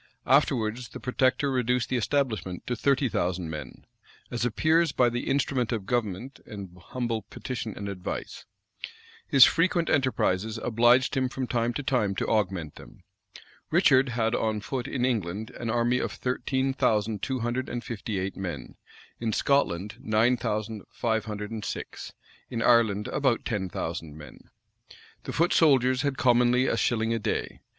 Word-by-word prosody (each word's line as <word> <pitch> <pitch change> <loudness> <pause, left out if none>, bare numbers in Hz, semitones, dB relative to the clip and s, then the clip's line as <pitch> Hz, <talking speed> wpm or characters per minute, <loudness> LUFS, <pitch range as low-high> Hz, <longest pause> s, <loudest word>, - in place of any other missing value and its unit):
[] - - -44
Afterwards 125 -4 +2
the - - -9
protector 130 +2 +1
reduced 125 -1 0
the - - 0
establishment 115 -7 -1
to 125 - -2
thirty 135 +2 +2
thousand 90 -6 -2
men; 75 -5 -8 0.5
as 120 -1 -2
appears 155 +7 +2
by 125 -3 +3
the 120 +1 -3
"instrument 135 -3 0
of 110 -5 -2
government 120 +2 -2
and 100 -4 -8
humble 120 -3 -2
petition 115 -5 -5
and 100 - -5
advice." 95 -2 -5 0.8
His 135 -2 +8
frequent 170 0 +2
enterprises 110 -6 +1
obliged 120 +4 +3
him 130 -1 +1
from 130 0 -3
time 120 -1 0
to 145 - -3
time 125 -8 +1
to - - -1
augment 95 -8 -1
them. - - -14 0.7
Richard 130 0 +4
had 115 0 +1
on 110 -2 0
foot 125 +3 -4
in 125 -2 -1
England 110 -3 -2
an 115 - -5
army 120 +2 +2
of - - -2
thirteen 130 +1 -1
thousand 105 -4 +1
two 130 -2 -2
hundred 120 +2 -2
and 120 -1 -4
fifty 110 -2 -4
eight 95 +1 -3
men, 85 -10 -6 0.4
in 115 -1 -1
Scotland 105 -7 +1
nine 110 +3 +3
thousand 110 -2 -3
five 110 -1 -1
hundred 105 -1 -5
and 110 -2 -5
six, - - -6 0.4
in 115 -2 -2
Ireland 110 -4 +3
about 135 -5 +1
ten 100 -4 -2
thousand 80 -3 -5
men.[v] 75 - -13 0.8
The - - -5
foot 170 +2 +2
soldiers 130 -5 +4
had 140 -2 -1
commonly 125 0 +4
a - - +1
shilling 115 -1 +1
a 115 - -1
day. 105 - -3
120 Hz, 160 wpm, -27 LUFS, 105-130 Hz, 0.8 s, His